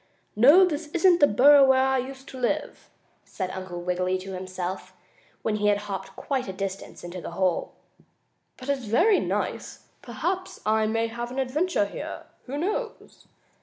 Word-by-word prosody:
"No, 290 Hz, -, +7 dB
this 310 Hz, -2 st, -3 dB
isn't 350 Hz, 0 st, +5 dB
the 290 Hz, -, +6 dB
burrow 280 Hz, +6 st, +7 dB
where 265 Hz, -1 st, +5 dB
I 265 Hz, 0 st, +2 dB
used 265 Hz, +1 st, -7 dB
to 260 Hz, -, -9 dB
live," 290 Hz, +5 st, -2 dB, 0.3 s
said 185 Hz, -2 st, -5 dB
Uncle 185 Hz, -2 st, -6 dB
Wiggily 180 Hz, +1 st, 0 dB
to 190 Hz, +1 st, -8 dB
himself, 185 Hz, 0 st, -5 dB, 0.5 s
when 215 Hz, -1 st, 0 dB
he 210 Hz, 0 st, +1 dB
had 205 Hz, -1 st, +4 dB
hopped 205 Hz, -2 st, -6 dB
quite 265 Hz, -4 st, -3 dB
a 190 Hz, -, -5 dB
distance 195 Hz, 0 st, -6 dB
into 175 Hz, +1 st, -7 dB
the -, -, -7 dB
hole. 185 Hz, -3 st, 0 dB, 0.8 s
"But 255 Hz, +2 st, -9 dB
it's 270 Hz, -3 st, -1 dB
very 355 Hz, -, +4 dB
nice. -, -, -4 dB
Perhaps 370 Hz, +1 st, -4 dB
I 215 Hz, 0 st, +2 dB
may 225 Hz, +1 st, 0 dB
have 235 Hz, +1 st, -5 dB
an 255 Hz, -, -8 dB
adventure 270 Hz, -, 0 dB
here. 200 Hz, -, -7 dB, 0.2 s
Who 270 Hz, +3 st, -5 dB
knows?" 425 Hz, +8 st, -4 dB
240 Hz, 165 wpm, -26 LUFS, 195-290 Hz, 0.8 s, No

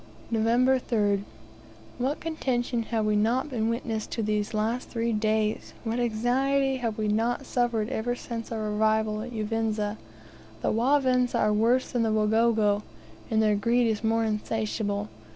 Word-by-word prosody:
November 240 Hz, +4 st, +3 dB
3rd. 205 Hz, -5 st, +1 dB, 0.8 s
What 265 Hz, +4 st, -1 dB
contention 255 Hz, -7 st, -1 dB
have 225 Hz, -2 st, 0 dB
we 210 Hz, 0 st, +2 dB
not 235 Hz, +7 st, +1 dB
been 225 Hz, -3 st, 0 dB
a -, -, +1 dB
witness 230 Hz, -2 st, -2 dB
to 225 Hz, -, -3 dB
these 210 Hz, -1 st, -1 dB
last 225 Hz, +4 st, -1 dB
three 230 Hz, -1 st, -1 dB
days! 215 Hz, 0 st, 0 dB
What 230 Hz, +1 st, -2 dB
anxiety 260 Hz, +4 st, +1 dB
have 230 Hz, -4 st, -3 dB
we 215 Hz, -1 st, -1 dB
not 230 Hz, +5 st, 0 dB
suffered 235 Hz, -4 st, 0 dB
ever 245 Hz, -1 st, -1 dB
since 230 Hz, -2 st, -6 dB
our 215 Hz, -2 st, -2 dB
arrival 215 Hz, 0 st, +1 dB
in 245 Hz, -, -6 dB
Uvinza! 215 Hz, -2 st, -2 dB, 0.6 s
The -, -, +2 dB
Wavinza 250 Hz, +1 st, +2 dB
are 210 Hz, -, +2 dB
worse 235 Hz, +4 st, +2 dB
than 245 Hz, -, 0 dB
the 225 Hz, -1 st, +1 dB
Wagogo, 215 Hz, -1 st, +2 dB, 0.5 s
and 220 Hz, 0 st, +2 dB
their 210 Hz, -1 st, +3 dB
greed 235 Hz, +4 st, +2 dB
is 220 Hz, -1 st, 0 dB
more 225 Hz, +1 st, +2 dB
insatiable. 210 Hz, -1 st, -2 dB
225 Hz, 155 wpm, -27 LUFS, 215-245 Hz, 0.8 s, November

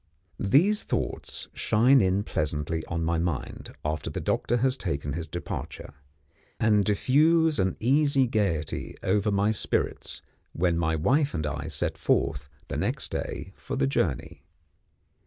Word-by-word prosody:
These 175 Hz, -, +3 dB
thoughts -, -, -3 dB
shine 125 Hz, +5 st, +4 dB
in 95 Hz, +1 st, +2 dB
pleasantly 75 Hz, -1 st, -2 dB
on 85 Hz, -1 st, -2 dB
my 85 Hz, 0 st, +1 dB
mind 85 Hz, -5 st, -4 dB
after 75 Hz, 0 st, -2 dB
the -, -, -4 dB
doctor 120 Hz, -, 0 dB
has 130 Hz, +2 st, +2 dB
taken 75 Hz, -, -3 dB
his 85 Hz, +2 st, -4 dB
departure, 85 Hz, -3 st, -6 dB, 0.7 s
and 105 Hz, -2 st, +4 dB
diffuse 155 Hz, -, +3 dB
an 95 Hz, 0 st, 0 dB
easy 135 Hz, +2 st, +3 dB
gaiety 100 Hz, -9 st, -1 dB
over 105 Hz, +2 st, +1 dB
my 100 Hz, +1 st, +2 dB
spirits 110 Hz, -, -2 dB, 0.3 s
when 85 Hz, 0 st, +1 dB
my 80 Hz, -1 st, +1 dB
wife 135 Hz, -, +2 dB
and 80 Hz, -2 st, -2 dB
I 75 Hz, 0 st, -4 dB
set 80 Hz, -3 st, -2 dB
forth, 70 Hz, +1 st, 0 dB, 0.2 s
the -, -, -4 dB
next -, -, -2 dB
day, -, -, -5 dB
for -, -, -6 dB
the 65 Hz, -, +2 dB
journey. 70 Hz, -, -1 dB
95 Hz, 140 wpm, -27 LUFS, 80-125 Hz, 0.7 s, shine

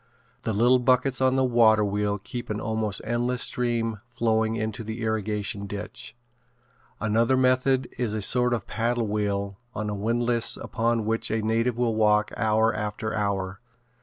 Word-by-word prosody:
The 110 Hz, -, -2 dB
little 120 Hz, +5 st, +4 dB
buckets 130 Hz, +1 st, +2 dB
on 130 Hz, 0 st, +3 dB
the 135 Hz, -, +2 dB
waterwheel 105 Hz, -4 st, +3 dB
keep 120 Hz, +4 st, -7 dB
an 105 Hz, 0 st, -2 dB
almost 110 Hz, -2 st, -1 dB
endless 120 Hz, +1 st, -1 dB
stream 115 Hz, -3 st, -1 dB
flowing 110 Hz, -2 st, 0 dB
into 110 Hz, 0 st, -3 dB
the 110 Hz, +2 st, -5 dB
irrigation 105 Hz, -2 st, -2 dB
ditch. 100 Hz, +3 st, -7 dB, 0.8 s
Another 115 Hz, +4 st, +2 dB
method 130 Hz, 0 st, +2 dB
is 115 Hz, -4 st, -1 dB
a 110 Hz, -, -2 dB
sort 125 Hz, +2 st, +3 dB
of 110 Hz, -, -5 dB
a -, -, -37 dB
paddle 120 Hz, +1 st, -1 dB
wheel 100 Hz, -1 st, -2 dB, 0.2 s
on 105 Hz, -1 st, -3 dB
a -, -, -3 dB
windlass 115 Hz, +3 st, +2 dB
upon 115 Hz, -1 st, -1 dB
which 115 Hz, +1 st, 0 dB
a 110 Hz, 0 st, -1 dB
native 115 Hz, +2 st, 0 dB
will 120 Hz, -2 st, +1 dB
walk 105 Hz, -1 st, +3 dB
hour 110 Hz, +1 st, +2 dB
after 105 Hz, 0 st, -3 dB
hour. 100 Hz, -2 st, -2 dB
110 Hz, 160 wpm, -25 LUFS, 105-120 Hz, 0.8 s, little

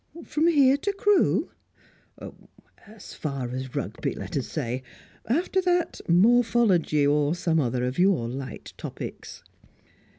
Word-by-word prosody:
"From 305 Hz, +2 st, +1 dB
here 280 Hz, -5 st, +5 dB
to 405 Hz, +8 st, -2 dB
Crewe?" 405 Hz, 0 st, +2 dB, 1.4 s
"As 215 Hz, -1 st, -12 dB
far 135 Hz, -5 st, -4 dB
as 130 Hz, 0 st, -6 dB
Rugby, -, -, -3 dB
let -, -, -7 dB
us -, -, -2 dB
say. 125 Hz, +2 st, -3 dB, 0.5 s
After 345 Hz, -, +1 dB
that 355 Hz, -1 st, 0 dB
morphology, 200 Hz, -5 st, +3 dB
or 145 Hz, +2 st, +2 dB
some 165 Hz, -2 st, 0 dB
other 125 Hz, -3 st, -1 dB
of 125 Hz, +6 st, -3 dB
your 180 Hz, -10 st, +3 dB
light 130 Hz, +2 st, -7 dB
topics." -, -, -8 dB
175 Hz, 125 wpm, -25 LUFS, -, 1.4 s, here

